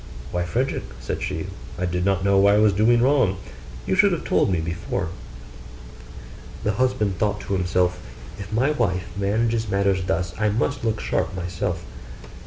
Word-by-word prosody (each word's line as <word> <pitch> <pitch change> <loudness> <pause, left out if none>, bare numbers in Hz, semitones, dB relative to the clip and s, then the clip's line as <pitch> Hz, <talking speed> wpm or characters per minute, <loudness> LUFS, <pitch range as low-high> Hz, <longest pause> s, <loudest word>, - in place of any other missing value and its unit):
'Why, 90 0 -1
Frederick,' 125 +9 -2
said - - -4
she, - - -3 0.3
'I 90 - -1
did 90 0 -1
not 95 -1 +1
know 100 0 +4
I 100 +1 +5
was 105 -1 +4
doing 115 +4 +4
wrong; 130 -8 +3 0.5
you - - 0
should 200 +1 +5
have 170 - -3
told - - +2
me 90 -3 +1
before.' 85 +2 -3 1.5
The 105 - +2
husband 110 -4 0
thought 105 -1 0
to - - -4
himself, 90 -1 +1 0.4
'If 100 0 -7
my 125 +7 +2
wife 95 -10 -1
manages 110 +3 0
matters 100 -1 +1
thus, 85 -1 -1
I 105 0 +2
must 115 +6 -1
look 110 -2 0
sharp 95 - -1
myself. 90 -2 -3
100 Hz, 165 wpm, -23 LUFS, 90-115 Hz, 1.5 s, I